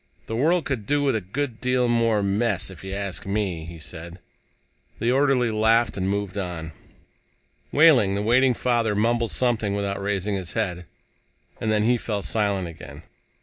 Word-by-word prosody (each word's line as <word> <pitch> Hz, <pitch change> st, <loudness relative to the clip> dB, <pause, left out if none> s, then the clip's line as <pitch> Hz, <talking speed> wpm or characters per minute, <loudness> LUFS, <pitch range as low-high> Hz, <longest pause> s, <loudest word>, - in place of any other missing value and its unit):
"The 115 Hz, -, -4 dB
world 160 Hz, +7 st, +2 dB
could 120 Hz, -7 st, -3 dB
do 145 Hz, 0 st, +2 dB
with 135 Hz, -4 st, +2 dB
a 110 Hz, -, -1 dB
good 120 Hz, +5 st, -4 dB
deal 125 Hz, -1 st, +2 dB
more 115 Hz, -3 st, +2 dB
mess, 100 Hz, -1 st, 0 dB
if 90 Hz, -3 st, -12 dB
you 95 Hz, -, -6 dB
ask 100 Hz, -1 st, -4 dB
me," 100 Hz, -5 st, -2 dB
he 85 Hz, 0 st, -9 dB
said. 85 Hz, +2 st, -7 dB, 0.8 s
The 120 Hz, -, +1 dB
orderly 130 Hz, -3 st, +2 dB
laughed 110 Hz, +2 st, +2 dB
and 95 Hz, -1 st, -1 dB
moved 100 Hz, -1 st, -2 dB
on. 85 Hz, -4 st, -5 dB, 1.0 s
Wehling, 135 Hz, -11 st, +5 dB
the 100 Hz, -, -1 dB
waiting 125 Hz, +3 st, +4 dB
father, 115 Hz, -4 st, +1 dB
mumbled 115 Hz, +2 st, +1 dB
something 115 Hz, -5 st, +1 dB
without 100 Hz, -1 st, -2 dB
raising 100 Hz, 0 st, -1 dB
his 95 Hz, -3 st, -4 dB
head. 90 Hz, -6 st, -2 dB, 0.7 s
And 110 Hz, -, -1 dB
then 105 Hz, -1 st, +2 dB
he 120 Hz, +2 st, +3 dB
fell 105 Hz, -3 st, -3 dB
silent 100 Hz, 0 st, 0 dB
again. 80 Hz, -1 st, -11 dB
105 Hz, 170 wpm, -24 LUFS, 95-120 Hz, 1.0 s, Wehling